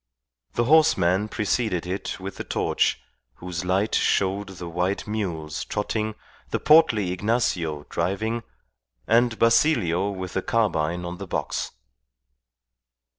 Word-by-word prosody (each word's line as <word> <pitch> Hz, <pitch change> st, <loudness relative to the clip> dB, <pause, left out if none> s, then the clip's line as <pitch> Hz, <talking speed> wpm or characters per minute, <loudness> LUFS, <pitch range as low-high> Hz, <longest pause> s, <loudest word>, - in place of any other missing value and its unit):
The 120 Hz, -, +1 dB
horseman 110 Hz, -, +4 dB
preceded 105 Hz, -4 st, -1 dB
it 95 Hz, +2 st, -4 dB
with 95 Hz, +1 st, -7 dB
the -, -, -4 dB
torch, -, -, 0 dB, 0.4 s
whose 90 Hz, +2 st, -5 dB
light 95 Hz, +4 st, 0 dB
showed 100 Hz, +1 st, +1 dB
the 85 Hz, -, -6 dB
white 90 Hz, +4 st, -1 dB
mules 85 Hz, -8 st, -3 dB
trotting, 110 Hz, +1 st, -2 dB, 0.3 s
the -, -, -1 dB
portly 115 Hz, -, +5 dB
Ignacio 90 Hz, -7 st, -1 dB
driving, 110 Hz, +5 st, -1 dB, 0.6 s
and 115 Hz, 0 st, +3 dB
Basilio 115 Hz, -, +3 dB
with 95 Hz, -2 st, -5 dB
the 95 Hz, -, 0 dB
carbine 90 Hz, -7 st, 0 dB
on 90 Hz, 0 st, -6 dB
the 100 Hz, -, -6 dB
box. -, -, -3 dB
100 Hz, 120 wpm, -24 LUFS, 90-110 Hz, 0.6 s, portly